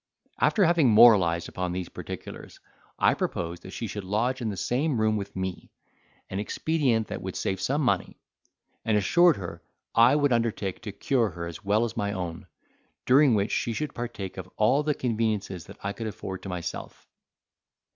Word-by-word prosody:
After 205 Hz, -4 st, +4 dB
having 165 Hz, -6 st, +4 dB
moralised 95 Hz, -7 st, +6 dB
upon 90 Hz, -1 st, -3 dB
these 90 Hz, -1 st, -3 dB
particulars, -, -, -9 dB, 0.4 s
I -, -, +4 dB
proposed 85 Hz, 0 st, -3 dB
that -, -, -10 dB
she 115 Hz, -, -5 dB
should 105 Hz, -1 st, -5 dB
lodge 115 Hz, +7 st, -1 dB
in 115 Hz, -, -1 dB
the 100 Hz, -, -5 dB
same 130 Hz, -, 0 dB
room 110 Hz, 0 st, +2 dB
with 100 Hz, -1 st, -5 dB
me, 95 Hz, -1 st, -4 dB, 0.6 s
an 95 Hz, -, -4 dB
expedient 125 Hz, -1 st, 0 dB
that -, -, -5 dB
would -, -, -5 dB
save 95 Hz, -1 st, -2 dB
some 145 Hz, +3 st, 0 dB
money: 125 Hz, -, 0 dB, 0.6 s
and 110 Hz, -2 st, +2 dB
assured 170 Hz, -, +4 dB
her, 85 Hz, -3 st, -7 dB, 0.3 s
I 120 Hz, +4 st, +6 dB
would 145 Hz, -3 st, +3 dB
undertake 115 Hz, -5 st, -1 dB
to 110 Hz, -3 st, -6 dB
cure 115 Hz, +2 st, +1 dB
her 85 Hz, -1 st, -6 dB
as 85 Hz, +3 st, -8 dB
well 105 Hz, +4 st, +2 dB
as 115 Hz, -, -5 dB
my 100 Hz, 0 st, -1 dB
own, 90 Hz, -3 st, -5 dB, 0.6 s
during 135 Hz, -1 st, +5 dB
which 100 Hz, 0 st, 0 dB
she 115 Hz, -, 0 dB
should 150 Hz, +6 st, -3 dB
partake 115 Hz, -6 st, -6 dB
of -, -, -7 dB
all 125 Hz, +7 st, +3 dB
the 150 Hz, -1 st, 0 dB
conveniences 110 Hz, -7 st, -2 dB
that -, -, -12 dB
I 100 Hz, 0 st, -2 dB
could 115 Hz, +1 st, -5 dB
afford 95 Hz, -3 st, -6 dB
to 95 Hz, -, -7 dB
myself. 90 Hz, -1 st, -6 dB
110 Hz, 180 wpm, -27 LUFS, 95-125 Hz, 0.6 s, moralised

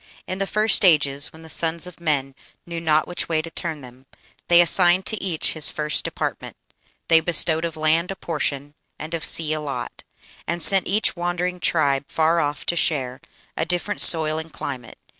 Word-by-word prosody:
In 185 Hz, -, -6 dB
the 195 Hz, -, -2 dB
first 215 Hz, +1 st, +1 dB
ages, 145 Hz, -5 st, +2 dB
when 160 Hz, 0 st, -16 dB
the -, -, -12 dB
sons 165 Hz, +1 st, 0 dB
of 180 Hz, -1 st, -12 dB
men 140 Hz, -4 st, -2 dB, 0.3 s
Knew 170 Hz, -1 st, -7 dB
not 155 Hz, -1 st, +1 dB
which 175 Hz, -, -4 dB
way 160 Hz, -2 st, 0 dB
to 165 Hz, -, -9 dB
turn 160 Hz, -4 st, -5 dB
them, 130 Hz, +1 st, -15 dB, 0.4 s
they 175 Hz, 0 st, +5 dB
assigned 175 Hz, +2 st, +3 dB
To 220 Hz, -4 st, -5 dB
each 175 Hz, -5 st, -1 dB
his 155 Hz, -2 st, -2 dB
first 150 Hz, 0 st, -2 dB
department; -, -, -6 dB, 0.5 s
they 165 Hz, -, +5 dB
bestowed 160 Hz, 0 st, 0 dB
Of 165 Hz, -1 st, -6 dB
land 160 Hz, +3 st, +1 dB
a 195 Hz, -, -5 dB
portion 145 Hz, -4 st, -5 dB, 0.2 s
and 155 Hz, +2 st, -8 dB
of 165 Hz, -, -4 dB
sea 155 Hz, -2 st, +3 dB
a 155 Hz, -, -4 dB
lot, 145 Hz, -2 st, -7 dB, 0.4 s
And 170 Hz, +1 st, -3 dB
sent 195 Hz, -2 st, +7 dB
each 210 Hz, +1 st, 0 dB
wandering 175 Hz, +1 st, -3 dB
tribe 140 Hz, -5 st, 0 dB
far 165 Hz, +1 st, 0 dB
off 145 Hz, -2 st, -3 dB
to 175 Hz, -, -1 dB
share 135 Hz, -6 st, -2 dB, 0.3 s
A -, -, -2 dB
different 180 Hz, +5 st, -1 dB
soil 155 Hz, -1 st, +7 dB
and 160 Hz, 0 st, -9 dB
climate. 125 Hz, -2 st, -8 dB
160 Hz, 190 wpm, -21 LUFS, 150-175 Hz, 0.5 s, sent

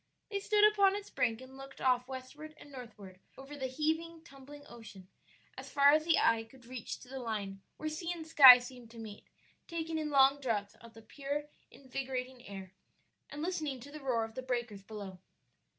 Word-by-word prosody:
They 400 Hz, -, -1 dB
stood 420 Hz, +1 st, +2 dB
upon 400 Hz, -2 st, +3 dB
its 410 Hz, 0 st, -7 dB
brink 230 Hz, -1 st, 0 dB
and 260 Hz, +1 st, -12 dB
looked 270 Hz, 0 st, -11 dB
off 250 Hz, -1 st, +2 dB
westward 270 Hz, +4 st, -9 dB
and 290 Hz, -, -14 dB
northward 215 Hz, -8 st, -11 dB, 0.2 s
over 270 Hz, +2 st, -10 dB
the 265 Hz, -2 st, -3 dB
heaving, 320 Hz, +4 st, -2 dB
tumbling 285 Hz, -1 st, -13 dB
ocean, 210 Hz, -5 st, -12 dB, 0.5 s
as -, -, -9 dB
far 280 Hz, 0 st, +6 dB
as 310 Hz, +1 st, +3 dB
the 330 Hz, -1 st, +4 dB
eye 225 Hz, 0 st, +3 dB
could 245 Hz, +2 st, -18 dB
reach 250 Hz, -2 st, -6 dB
to -, -, -13 dB
the 265 Hz, +1 st, -7 dB
line 205 Hz, -5 st, -4 dB, 0.2 s
where 310 Hz, -, -4 dB
sea 335 Hz, +3 st, -3 dB
and 335 Hz, -2 st, -6 dB
sky 265 Hz, -5 st, +11 dB
seemed 245 Hz, -1 st, -10 dB
to 230 Hz, -, -14 dB
meet, 215 Hz, -2 st, -9 dB, 0.4 s
taking 325 Hz, -1 st, -3 dB
in 305 Hz, -1 st, -2 dB
long 275 Hz, 0 st, +5 dB
draughts 210 Hz, -6 st, -2 dB
of 230 Hz, -1 st, -14 dB
the 225 Hz, -, -13 dB
pure, 285 Hz, +5 st, -4 dB, 0.3 s
invigorating 260 Hz, -1 st, -6 dB
air, 195 Hz, -2 st, -8 dB, 0.6 s
and 295 Hz, +1 st, -6 dB
listening 310 Hz, -7 st, -2 dB
to 285 Hz, +4 st, -11 dB
the 305 Hz, -, -8 dB
roar 250 Hz, -5 st, 0 dB
of 225 Hz, -, -12 dB
the 260 Hz, -, -5 dB
breakers 240 Hz, -5 st, -3 dB
below. 195 Hz, -3 st, -9 dB
260 Hz, 195 wpm, -33 LUFS, 230-300 Hz, 0.6 s, sky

